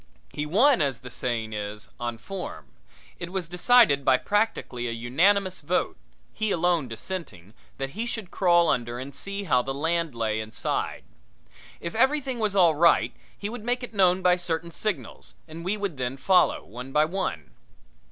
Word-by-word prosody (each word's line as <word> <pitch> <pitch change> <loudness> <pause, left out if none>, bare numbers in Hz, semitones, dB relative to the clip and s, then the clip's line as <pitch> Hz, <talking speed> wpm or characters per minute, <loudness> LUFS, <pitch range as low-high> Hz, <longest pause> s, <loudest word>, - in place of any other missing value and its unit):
He 150 0 -3
won, 235 - +4
as 135 -4 0
the 125 - -9
saying 115 -3 -2
is, 105 0 -5
on 120 -1 -3
form. 190 - -7 0.5
It 175 0 -6
was 185 -3 -2
decided 180 - +5
by 130 -1 +5
practically 205 - -1
a - - -2
unanimous 185 - +2
vote, 170 +5 0 0.4
he 215 0 -1
alone 175 -5 +1
dissenting, 115 - -7 0.2
that 135 0 -3
he 225 +8 -3
should 220 -6 -5
crawl 175 -2 +4
under 120 0 0
and 135 +2 -7
see 200 0 -4
how 130 -9 +3
the 135 +1 -4
land 165 -1 -1
lay 110 -1 -1
inside. 110 0 -3 0.8
If 170 - -5
everything 265 +1 +1
was 210 -3 0
all 175 -4 +6
right 170 +3 +4 0.2
he 200 - -4
would 225 0 -7
make 245 +2 -1
it 245 - -7
known 185 -2 +3
by 180 0 +5
certain 170 -1 -2
signals 210 +2 -3
and 165 +1 -9
we 195 +4 -1
would 200 -7 -3
then 130 +1 -3
follow, 180 +7 +3
one 125 +6 -9
by 150 +2 +4
one. 160 - -3
170 Hz, 170 wpm, -26 LUFS, 125-195 Hz, 0.8 s, all